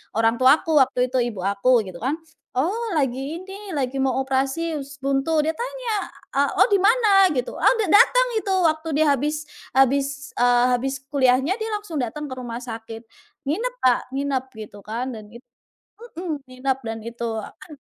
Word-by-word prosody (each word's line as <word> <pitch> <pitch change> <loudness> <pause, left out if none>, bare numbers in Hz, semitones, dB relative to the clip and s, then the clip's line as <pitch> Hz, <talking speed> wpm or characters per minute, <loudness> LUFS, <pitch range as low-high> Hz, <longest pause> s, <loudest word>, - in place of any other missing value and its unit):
orang 225 +1 +2
tua 260 +2 +7
aku 315 -3 +3
waktu 255 -1 +2
itu 260 - +1
ibu 235 -6 -2
aku 210 +5 +3
gitu 185 -3 -9
kan, 265 +6 -1 0.4
“Oh, 395 - -1
lagi 275 +4 -2
ini, 390 -1 -8
lagi 270 -1 -2
mau 265 0 +1
operasi 275 +5 -1
usus 280 +1 -9
buntu." 275 +3 +1
Dia 315 - +1
tanya, - - -3 0.4
“Eh 280 +1 +2
Oh, - - +2
di 400 - +4
mana?” 405 -2 +5
Gitu. 250 -1 -2
Oh, - - +3
dateng 440 +6 +5
itu 395 -2 -2
waktu 315 0 +1 0.2
dia - - +2
habis 300 +3 -1 0.3
habis, 280 +1 +2
eee, 245 0 +4 0.2
habis 270 +2 -2 0.2
kuliahnya 270 - +2
dia 440 0 -3
langsung 410 -8 -5
datang 290 +4 -4
ke - - -4
rumah 240 0 -6
sakit. 225 -1 -8 0.4
Nginep, 450 - -2
Kak. 250 -2 +5 0.2
Nginep 275 -2 -1 0.2
gitu 205 -1 -13
kan, 235 +5 -3
dan 215 -3 -9
itu 235 +2 -12 0.8
mhm, 315 -6 -4
nginep. 255 +1 -1
Dan 225 0 -4
itu 235 0 -4
apan 265 - -11
270 Hz, 175 wpm, -23 LUFS, 245-325 Hz, 0.8 s, tua